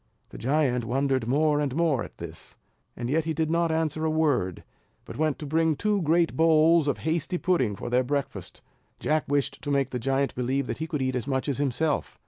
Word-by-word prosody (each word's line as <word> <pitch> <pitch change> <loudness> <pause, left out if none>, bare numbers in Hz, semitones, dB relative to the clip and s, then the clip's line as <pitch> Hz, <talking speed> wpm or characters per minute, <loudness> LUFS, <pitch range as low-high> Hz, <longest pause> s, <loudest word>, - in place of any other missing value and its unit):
The - - -10
giant 130 -2 +1
wondered 130 0 0
more 150 +3 +2
and 140 -3 -1
more 160 -7 +1
at - - -11
this; 80 -1 -9 0.4
yet 145 +7 0
he 160 -1 -2
did 160 0 0
not 170 0 +2
answer 160 -1 -1
a 160 - +1
word, 145 - 0 0.4
but - - -9
went 155 -1 0
to 150 - -7
bring 160 +2 +1
two 210 +4 0
great 165 +1 +2
bowls 160 0 +4
of 145 - +1
hasty 165 +3 0
pudding 130 - +1
for - - -7
their 125 +1 +2
breakfast. 140 +2 -4 0.4
Jack 155 0 0
wished 140 -1 -1
to 145 - -5
make 140 -2 +1
the 125 - -2
giant 135 +3 0
believe 130 +2 -1
that - - -5
he 160 - -3
could 150 -4 -2
eat 130 0 -1
as 125 +1 -3
much 130 0 -1
as 140 -2 -1
himself. 145 +2 -1
145 Hz, 210 wpm, -26 LUFS, 130-160 Hz, 0.4 s, bowls